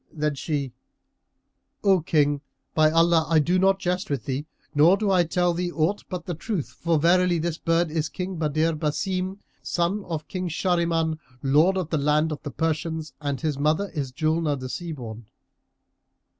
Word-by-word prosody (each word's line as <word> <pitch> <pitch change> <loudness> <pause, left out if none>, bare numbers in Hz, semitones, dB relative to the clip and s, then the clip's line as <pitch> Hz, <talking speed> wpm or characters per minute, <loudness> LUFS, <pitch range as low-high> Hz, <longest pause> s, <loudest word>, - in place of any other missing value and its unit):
and 150 -1 +1
she 140 -3 -3 1.1
"O 195 -3 +4
King, 145 -3 +2 0.3
by 155 -1 +5
Allah, 165 0 +4
I 165 - +4
do 175 +5 +3
not 195 +1 +4
jest 180 +1 -2
with 140 -6 -2
thee 140 +3 -3 0.3
nor 165 +6 +6
do 205 -1 0
I 180 -2 +5
tell 175 +1 +1
thee 175 +1 -2
aught 170 +5 0
but 180 -2 -5
the 175 - -3
truth; 170 - -3
for 165 -1 +2
verily 175 +2 +3
this 165 0 -2
bird 165 -1 +1
is 155 -1 -1
King 185 -1 -5
Badr 155 +1 +1
Basim, 185 +5 -2 0.2
son 175 +4 -1
of 160 -3 -4
King 185 +1 -3
Shahriman, 165 -2 0 0.2
Lord 155 +8 +4
of 180 -4 -3
the 155 - +1
land 150 +2 +2
of 150 - -5
the 145 - -5
Persians, 160 +1 -2
and 145 -2 -2
his 150 -4 -1
mother 155 +7 +1
is 140 -5 -3
Julnar 155 0 0
the 130 0 -6
Sea 170 +5 -5
born." 115 -6 -8
160 Hz, 175 wpm, -25 LUFS, 150-180 Hz, 1.1 s, nor